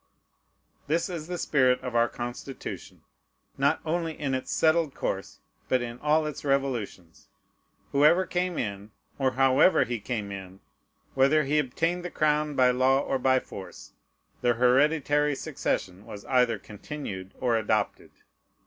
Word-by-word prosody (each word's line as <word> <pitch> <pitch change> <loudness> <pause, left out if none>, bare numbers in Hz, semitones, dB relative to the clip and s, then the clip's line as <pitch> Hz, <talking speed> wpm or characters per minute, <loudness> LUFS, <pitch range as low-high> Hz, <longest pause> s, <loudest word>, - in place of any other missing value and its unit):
This 165 +5 0
is 165 -3 -5
the 180 0 -4
spirit 130 -6 +2
of 125 -2 -5
our 120 0 +3
Constitution, 120 +2 -7 0.5
not - - +1
only 165 0 -2
in 140 -3 -1
its 130 0 -3
settled 160 -2 +2
course, 95 0 -4 0.3
but 125 -1 +2
in 120 0 -7
all 155 +2 +2
its 150 - -5
revolutions. 125 - -2 0.6
Whoever 155 +6 +4
came 180 -1 -2
in, 100 -2 -4 0.3
or 130 -1 +1
however 135 +7 +4
he 120 -1 -3
came 105 -2 -4
in, 95 -1 -8 0.5
whether 140 +3 +4
he 150 +2 +1
obtained 165 +6 -1
the 180 - -4
crown 150 -2 0
by 125 -1 +5
law 130 +2 +3
or 135 - -1
by 130 0 +3
force, 95 -6 -11 0.5
the 120 -1 +2
hereditary 145 +4 +3
succession 95 -6 -3
was 100 - -9
either 125 -3 +2
continued 100 -4 -8
or 125 -2 +1
adopted. 110 -1 -1
130 Hz, 140 wpm, -27 LUFS, 120-150 Hz, 0.6 s, by